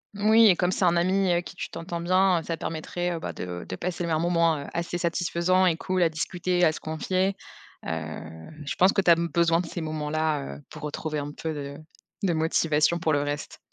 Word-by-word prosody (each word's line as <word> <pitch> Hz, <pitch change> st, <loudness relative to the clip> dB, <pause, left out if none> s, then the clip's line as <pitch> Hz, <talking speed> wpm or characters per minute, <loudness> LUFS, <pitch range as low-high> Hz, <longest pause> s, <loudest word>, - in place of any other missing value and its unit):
Oui 220 Hz, +2 st, +6 dB
et 185 Hz, -, +6 dB
comme 180 Hz, +1 st, +1 dB
c'est 185 Hz, -, +1 dB
un 175 Hz, 0 st, +4 dB
ami 185 Hz, +2 st, +2 dB
avec 175 Hz, 0 st, +1 dB
qui 190 Hz, -, -9 dB
tu -, -, -5 dB
t'entends 170 Hz, 0 st, -5 dB
bien, 185 Hz, 0 st, +3 dB
ça 165 Hz, -, -3 dB
permettrait, 175 Hz, +2 st, -3 dB
heu, 165 Hz, -, -4 dB
bah -, -, -5 dB
de 90 Hz, -1 st, -6 dB
de -, -, -4 dB
passer 175 Hz, -, -3 dB
le -, -, -3 dB
un 160 Hz, -1 st, +1 dB
moment, 170 Hz, -2 st, +2 dB
heu, 140 Hz, -, -6 dB
assez 170 Hz, +1 st, -2 dB
satisfaisant 175 Hz, +1 st, +1 dB
et 175 Hz, -3 st, +3 dB
cool 185 Hz, +2 st, -1 dB
à 170 Hz, -, +5 dB
discuter, 180 Hz, +3 st, -1 dB
à 160 Hz, -, +6 dB
se -, -, -7 dB
confier. 185 Hz, +5 st, -1 dB, 0.5 s
Heu, 80 Hz, -, -6 dB, 0.2 s
je -, -, -3 dB
pense 185 Hz, +2 st, +5 dB
que 195 Hz, -, +3 dB
tu 175 Hz, -3 st, +5 dB
as -, -, +8 dB
b 170 Hz, +1 st, -1 dB
besoin 170 Hz, -1 st, +3 dB
de 180 Hz, -, -2 dB
ces 170 Hz, -, -5 dB
moments-là, 155 Hz, -1 st, -2 dB
heu, -, -, -14 dB
pour 155 Hz, -, -10 dB
retrouver 150 Hz, 0 st, -3 dB
un 145 Hz, +1 st, -5 dB
peu 160 Hz, -1 st, -4 dB
de 140 Hz, -1 st, -6 dB, 0.5 s
de 175 Hz, -3 st, +2 dB
motivation 160 Hz, 0 st, +2 dB
pour 160 Hz, -, +1 dB
le 145 Hz, -, +2 dB
reste. 145 Hz, 0 st, -4 dB
170 Hz, 230 wpm, -26 LUFS, 155-180 Hz, 0.5 s, as